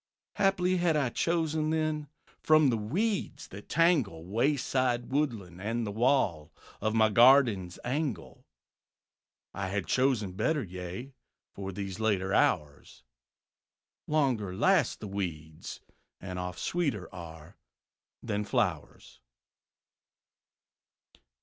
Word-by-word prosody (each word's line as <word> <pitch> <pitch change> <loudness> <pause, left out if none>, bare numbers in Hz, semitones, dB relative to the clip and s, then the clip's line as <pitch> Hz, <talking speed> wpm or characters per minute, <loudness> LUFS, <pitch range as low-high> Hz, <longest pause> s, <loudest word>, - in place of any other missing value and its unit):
Haply 185 -2 +2
had 170 -3 +2
I 140 -4 +1
chosen 160 +1 0
then 155 -1 -1 0.3
From 155 -3 +5
the 115 - 0
weeds 190 - -2
that 100 +2 -11
tangle 140 - +2
Wayside, 125 +2 0
woodland 110 - -2
and 115 +3 -2
the 105 - -3
wall 105 - +1 0.3
Of 110 +1 0
my 110 -1 +5
garden's 115 -6 +5
angle, 125 - -3 1.1
I 95 -1 -3
had 100 0 -2
chosen 125 -7 +1
better, 145 - 0
yea, 90 +7 -7 0.4
For 95 -1 -6
these 95 0 -6
later 100 -3 0
hours 75 -8 0 1.0
Longer 125 -11 0
last 175 - +2
the 105 - -5
weeds, 80 -6 -6 0.4
and 90 -1 -6
oft 90 0 -5
Sweeter 140 - -1
are 80 -3 -10 0.7
than 105 -2 -2
flowers. 90 - -2
110 Hz, 105 wpm, -29 LUFS, 95-145 Hz, 1.1 s, From